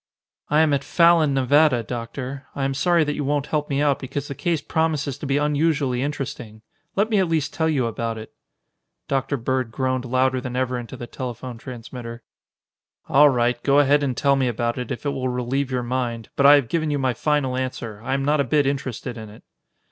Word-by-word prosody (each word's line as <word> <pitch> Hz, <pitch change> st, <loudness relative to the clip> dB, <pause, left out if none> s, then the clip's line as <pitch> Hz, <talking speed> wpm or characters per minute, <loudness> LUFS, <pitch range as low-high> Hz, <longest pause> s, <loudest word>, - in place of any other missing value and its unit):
"I 150 Hz, +1 st, +4 dB
am 155 Hz, -2 st, +3 dB
at 140 Hz, -1 st, 0 dB
Fallon, 170 Hz, -3 st, +4 dB
Nevada, 135 Hz, -1 st, +4 dB
Doctor. 125 Hz, +4 st, -6 dB
I'm 135 Hz, -1 st, -1 dB
sorry 170 Hz, +5 st, +3 dB
that 150 Hz, -1 st, -1 dB
you 145 Hz, -, -3 dB
won't 145 Hz, 0 st, 0 dB
help 150 Hz, -1 st, -2 dB
me 140 Hz, 0 st, +1 dB
out 145 Hz, -2 st, +2 dB
because 140 Hz, +2 st, -5 dB
the -, -, -3 dB
case 170 Hz, +2 st, -1 dB
promises 150 Hz, -3 st, -1 dB
to 145 Hz, -, -5 dB
be 140 Hz, +1 st, +1 dB
unusually 145 Hz, -3 st, +1 dB
interesting. 125 Hz, -6 st, -5 dB, 0.3 s
Let 210 Hz, +3 st, +1 dB
me 210 Hz, -, +3 dB
at 190 Hz, -, +2 dB
least 160 Hz, -3 st, -1 dB
tell 160 Hz, 0 st, +1 dB
you 135 Hz, -6 st, +1 dB
about 115 Hz, 0 st, -3 dB
it." 110 Hz, -, -10 dB, 0.7 s
Dr. 135 Hz, +1 st, -1 dB
Bird 130 Hz, 0 st, -1 dB
groaned 130 Hz, +1 st, -1 dB
louder 130 Hz, +1 st, +1 dB
than 125 Hz, -1 st, -5 dB
ever 125 Hz, -1 st, -1 dB
into 120 Hz, +2 st, -8 dB
the 120 Hz, -, -6 dB
telephone 120 Hz, -1 st, -6 dB
transmitter. 120 Hz, -1 st, -8 dB, 0.9 s
"All 145 Hz, +2 st, +7 dB
right, 120 Hz, -2 st, +1 dB
go 140 Hz, +2 st, +3 dB
ahead 145 Hz, 0 st, +4 dB
and 130 Hz, -4 st, -1 dB
tell 140 Hz, -1 st, +3 dB
me 135 Hz, -2 st, +1 dB
about 120 Hz, +1 st, -1 dB
it 125 Hz, -, -5 dB
if 120 Hz, -, -5 dB
it 145 Hz, -, +1 dB
will 130 Hz, -2 st, -2 dB
relieve 125 Hz, +2 st, -1 dB
your 125 Hz, -2 st, -1 dB
mind, 120 Hz, -2 st, -3 dB
but 140 Hz, -, +5 dB
I 145 Hz, -, +9 dB
have 140 Hz, -5 st, +2 dB
given 155 Hz, +3 st, -1 dB
you 145 Hz, -, 0 dB
my 130 Hz, -2 st, 0 dB
final 140 Hz, 0 st, 0 dB
answer. 120 Hz, -5 st, -4 dB
I 130 Hz, +3 st, -1 dB
am 135 Hz, 0 st, -1 dB
not 150 Hz, +1 st, +2 dB
a -, -, +2 dB
bit 145 Hz, +2 st, +2 dB
interested 130 Hz, -4 st, -3 dB
in 110 Hz, -1 st, -9 dB
it." 105 Hz, -, -15 dB
135 Hz, 215 wpm, -23 LUFS, 125-145 Hz, 0.9 s, I